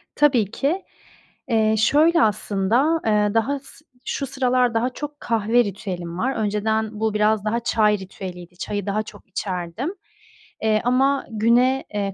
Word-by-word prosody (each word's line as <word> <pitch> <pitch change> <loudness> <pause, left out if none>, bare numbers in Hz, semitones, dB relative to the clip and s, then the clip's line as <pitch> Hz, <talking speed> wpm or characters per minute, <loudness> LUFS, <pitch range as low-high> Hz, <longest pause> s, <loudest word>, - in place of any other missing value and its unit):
Tabii 245 -9 +3
ki. 315 +11 -1 0.7
Eee, 220 -1 +3
şöyle 310 +9 +4
aslında, 215 +9 +1
eee, 210 -1 +2
daha 230 +6 +1
s 280 +2 -17 0.2
şu 275 - -3
sıralar 255 -2 +1
daha 230 +3 +1
çok 290 +3 -7
kahve 230 +1 +2
ritüelim 180 -4 -5
var. 260 +7 -1
Önceden 215 +1 -1
bu 220 -1 0
biraz 210 0 +2
daha 230 +2 0
çay 215 -3 +2
ritüeliydi. 180 -2 -9
Çayı 205 +1 -3
daha 210 +2 -1
çok - - -14
içerdim. 190 - -4 0.7
Eee, 215 -1 +2
ama 270 +3 +2
güne, 240 +4 +2
eee, 200 -1 -2
220 Hz, 145 wpm, -22 LUFS, 205-255 Hz, 0.7 s, şöyle